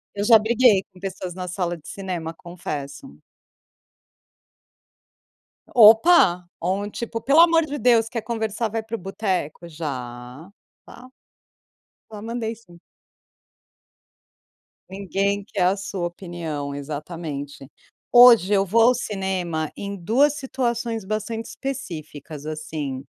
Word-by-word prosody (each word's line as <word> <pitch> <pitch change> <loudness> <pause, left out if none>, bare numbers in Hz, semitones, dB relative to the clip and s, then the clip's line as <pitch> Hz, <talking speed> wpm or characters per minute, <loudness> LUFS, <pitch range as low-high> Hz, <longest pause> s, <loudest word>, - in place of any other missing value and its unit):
Eu 205 - -2
já 225 +1 +7
briguei 220 -2 +4
com 185 - -17
pessoas 190 -1 -5
na 180 0 -6
sala 175 -1 -2
de 155 - -15
cinema, 175 -4 -5
confesso. 165 - -7 2.5
Opa, 220 - +6 0.2
ou 185 +4 -1
um, 205 - -6
tipo: 230 +1 -5
"Pelo 280 +7 +4
amor 330 -1 +5
de 290 -1 -5
Deus, 235 -3 +3
quer 230 0 -3
conversar, 220 0 -2
vai 225 +1 -3
para 225 +1 -5
o - - -12
boteco". 185 -4 -3
Já, 130 -1 -7 0.3
tá. 250 +1 -14 1.0
Já 210 -1 -8
mandei 230 0 -4
sim. 175 -6 -19 2.1
Ninguém 200 +1 -2
quer 195 -4 -1
a 185 +2 +3
sua 195 -3 -4
opinião, 170 -5 -6
exatamente. 145 -1 -6 0.4
Hoje 240 -5 +8
eu 195 -1 +3
vou 225 +5 +3
ao 250 - +4
cinema 190 -8 -3
em 200 0 -5
duas 245 - +2
situações 240 -5 -3
bastante 215 +3 -4
específicas, 155 - -7
assim: 155 -4 -5
195 Hz, 120 wpm, -23 LUFS, 165-230 Hz, 2.5 s, Hoje